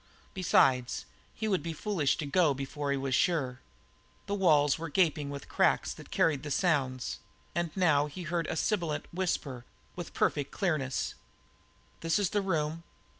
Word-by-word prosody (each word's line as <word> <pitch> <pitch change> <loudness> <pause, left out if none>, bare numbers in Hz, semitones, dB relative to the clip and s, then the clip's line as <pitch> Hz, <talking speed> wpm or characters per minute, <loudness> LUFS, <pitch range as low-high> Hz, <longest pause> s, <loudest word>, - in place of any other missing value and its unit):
Besides, 130 -9 +3 0.3
he 220 - -2
would 190 -4 +1
be 165 0 -4
foolish 165 -6 0
to 155 - -3
go 150 0 +3
before 140 +2 -4
he 140 - +1
was 135 -1 -2
sure. 130 -6 +1 0.7
The 200 - -3
walls 155 -7 +4
were 165 -1 -4
gaping 150 -3 +2
with 140 0 -7
cracks - - +2
that - - -13
carried 150 -5 +2
the 150 - -6
sounds, 135 -6 0 0.3
and 170 -1 0
now 150 -6 +4
he 165 +5 -7
heard 170 0 -1
a - - -2
sibilant 170 -4 0
whisper 150 -8 -2 0.3
with 175 -2 -6
a - - -26
perfect 145 -2 +1
clearness. 150 -9 -1 0.9
"This 165 0 +1
is 200 -4 +1
the 205 - +1
room." 165 -4 -1
155 Hz, 165 wpm, -30 LUFS, 140-175 Hz, 0.9 s, walls